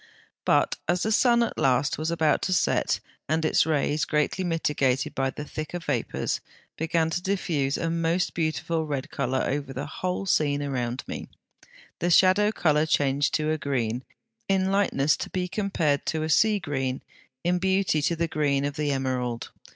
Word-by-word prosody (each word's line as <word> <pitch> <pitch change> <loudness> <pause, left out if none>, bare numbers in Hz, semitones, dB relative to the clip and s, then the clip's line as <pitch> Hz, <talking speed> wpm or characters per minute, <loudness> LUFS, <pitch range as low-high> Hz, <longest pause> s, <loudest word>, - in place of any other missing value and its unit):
But - - +3
as 175 +2 +1
the 220 - 0
sun 235 +1 +4
at - - -3
last 130 +2 +2
was 155 +1 -1
about 160 -2 +2
to - - +2
set, 180 - +1 0.3
and 160 +1 +1
its 155 - +3
rays, 150 0 +1
greatly 150 +5 0
mitigated 150 -6 0
by 135 0 0
the 150 +2 -6
thicker 155 +3 -5
vapours, 145 -8 -2 0.3
began 160 0 0
to 175 - -1
diffuse 170 -8 -1
a 165 - -2
most 165 +2 0
beautiful 160 0 -1
red 140 -3 -3
colour 130 -1 -1
over 140 0 -2
the 135 +3 -4
whole 180 +5 -3
scene 145 -5 +1
around 125 -2 -2
me, - - -6 0.7
the 175 - 0
shadow 190 +4 +5
colour 155 -6 +2
changed 140 -1 +2
to 155 0 0
a 155 - -1
green, 125 -4 -1 0.5
in 190 0 +2
lightness 155 -8 +2
to - - -5
be 180 -1 -2
compared 175 -8 0
to 160 -1 0
a 160 - -2
sea 215 +6 +4
green, 135 -7 -3 0.4
in 180 +1 +1
beauty 190 -4 +1
to 165 +3 +1
the 170 +1 0
green 140 -3 0
of 145 +1 -3
the 150 -1 0
emerald. 125 -3 -2
155 Hz, 175 wpm, -26 LUFS, 140-175 Hz, 0.7 s, shadow